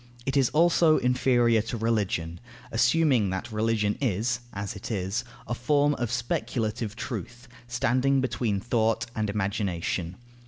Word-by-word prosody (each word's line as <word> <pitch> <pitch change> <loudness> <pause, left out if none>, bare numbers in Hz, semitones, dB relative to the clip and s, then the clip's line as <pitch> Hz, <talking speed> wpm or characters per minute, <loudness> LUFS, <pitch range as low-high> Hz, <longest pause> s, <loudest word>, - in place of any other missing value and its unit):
It 135 - -1
is 135 -3 +4
also 165 0 +4
inferior 125 -2 +3
to 115 +2 -5
Religion, 100 -7 -1 0.3
assuming 120 -2 +3
that 95 +6 -4
religion 105 -1 0
is 120 0 0
(as 100 0 -5
it 100 - -7
is) 100 +2 -2 0.2
a - - -2
form 145 +4 +2
of 120 -5 -3
speculative 115 -2 -2
truth, 120 +1 -6 0.2
standing 130 +3 +2
between 120 -5 -1
thought 115 +1 +1
and 110 -1 -1
imagination. 95 -4 -2
115 Hz, 130 wpm, -27 LUFS, 105-125 Hz, 0.3 s, is